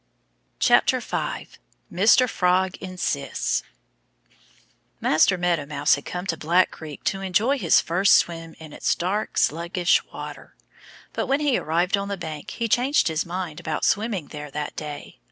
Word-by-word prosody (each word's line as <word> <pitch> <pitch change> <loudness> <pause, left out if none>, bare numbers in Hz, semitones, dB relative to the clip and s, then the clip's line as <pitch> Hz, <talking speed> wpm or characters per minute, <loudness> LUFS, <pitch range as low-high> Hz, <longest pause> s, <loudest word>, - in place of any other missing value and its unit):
5 - - +5 1.1
Mr. 220 +7 +5
Frog 185 -2 +1
Insists 185 - -2 1.4
MASTER 170 +4 +3
MEADOW 175 -5 0
MOUSE 145 0 +2
had 140 - -2
come 180 +1 -5
to 170 - -1
Black 170 +4 +2
Creek 155 -3 -10
to 195 - -1
enjoy 215 +9 +1
his - - +4
first 190 +4 +4
swim 165 -1 0
in 155 -2 -11
its - - 0
dark, 200 +5 -2
sluggish 170 +2 +2
water. - - -9 0.6
But - - -2
when 275 +2 +1
he 290 -4 +2
arrived 175 +3 +1
on 200 0 -3
the 200 0 -3
bank 155 -4 -7
he 230 - -3
changed 255 - +2
his 160 +1 -2
mind 175 -3 -4
about 155 -1 -2
swimming 205 -6 0
there 150 0 -7
that 150 +1 -5
day. 150 -2 -8
180 Hz, 150 wpm, -24 LUFS, 155-195 Hz, 1.4 s, 5